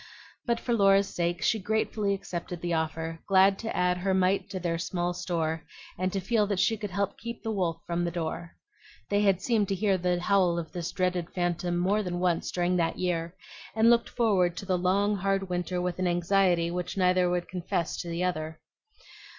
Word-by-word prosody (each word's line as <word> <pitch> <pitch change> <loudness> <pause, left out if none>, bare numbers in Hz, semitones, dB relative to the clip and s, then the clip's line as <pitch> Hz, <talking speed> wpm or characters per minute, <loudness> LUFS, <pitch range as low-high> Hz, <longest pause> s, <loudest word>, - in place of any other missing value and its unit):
But 235 -1 +1
for 240 - -1
Laura's 195 -2 +4
sake 175 0 -1
she 220 - +2
gratefully 210 0 0
accepted 175 -2 -6
the 175 -1 -1
offer, 160 0 -2
glad 195 0 +5
to 225 - -4
add 180 0 +2
her 190 +1 +1
mite 190 +2 +1
to 190 -1 -4
their 165 -1 -1
small 175 0 -1
store, 165 -3 -2 0.3
and 185 +1 -1
to 195 - -1
feel 210 +2 +1
that 200 -2 -1
she 195 +4 +3
could 210 -1 -5
help 200 +1 -2
keep 235 +1 -7
the 225 - -2
wolf 180 -6 -1
from 170 0 -1
the 175 - 0
door. 170 0 -4 0.6
They 205 0 +3
had 195 -3 +2
seemed 220 -4 +2
to 195 - 0
hear 195 -1 +1
the 180 0 +1
howl 180 -2 +2
of 165 -2 -4
this 175 -2 -4
dreaded 180 -3 -1
phantom 175 -1 -1
more 195 +4 +2
than 180 -3 -3
once 175 -2 0
during 180 0 0
that 165 -1 0
year, 170 -1 -2 0.4
and 225 +1 +5
looked 235 0 +3
forward 185 -7 +2
to 195 - -5
the 185 -1 +1
long 200 +3 +1
hard 195 0 0
winter 180 0 -2
with 180 0 -2
an 185 - +1
anxiety 175 -1 +2
which 180 +2 -4
neither 180 -1 +3
would 175 0 -1
confess 175 -2 -2
to 175 - -5
the 170 +2 -2
other. 160 -3 -2
180 Hz, 205 wpm, -28 LUFS, 175-195 Hz, 0.6 s, glad